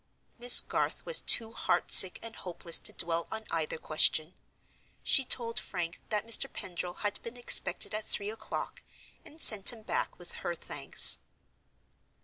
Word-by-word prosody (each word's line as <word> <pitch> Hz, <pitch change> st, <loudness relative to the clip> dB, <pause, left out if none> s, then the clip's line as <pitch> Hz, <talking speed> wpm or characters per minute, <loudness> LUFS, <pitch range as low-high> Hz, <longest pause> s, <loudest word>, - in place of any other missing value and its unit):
Miss 245 Hz, +1 st, +6 dB
Garth -, -, -6 dB
was -, -, +2 dB
too 225 Hz, -1 st, +4 dB
heart -, -, -4 dB
sick 185 Hz, -1 st, +8 dB
and 230 Hz, -1 st, -11 dB
hopeless 170 Hz, -2 st, +1 dB
to -, -, -3 dB
dwell 165 Hz, 0 st, -5 dB
on 220 Hz, 0 st, -8 dB
either 160 Hz, -1 st, -5 dB
question. 155 Hz, +1 st, 0 dB, 0.7 s
She 270 Hz, -, +1 dB
told 235 Hz, -2 st, -4 dB
Frank 175 Hz, -2 st, -8 dB
that 210 Hz, -1 st, -4 dB
Mr. 230 Hz, -1 st, +3 dB
Pendril 175 Hz, -1 st, -8 dB
had 205 Hz, -, -3 dB
been 235 Hz, +1 st, -11 dB
expected 240 Hz, -, +1 dB
at 215 Hz, 0 st, -7 dB
three 205 Hz, +1 st, -5 dB
o'clock, 225 Hz, -, -9 dB, 0.4 s
and 310 Hz, -, -18 dB
sent 215 Hz, -8 st, +4 dB
him 225 Hz, -2 st, -16 dB
back -, -, -6 dB
with 175 Hz, -, -12 dB
her 175 Hz, -, -6 dB
thanks. -, -, +3 dB
205 Hz, 155 wpm, -27 LUFS, 175-230 Hz, 0.7 s, sick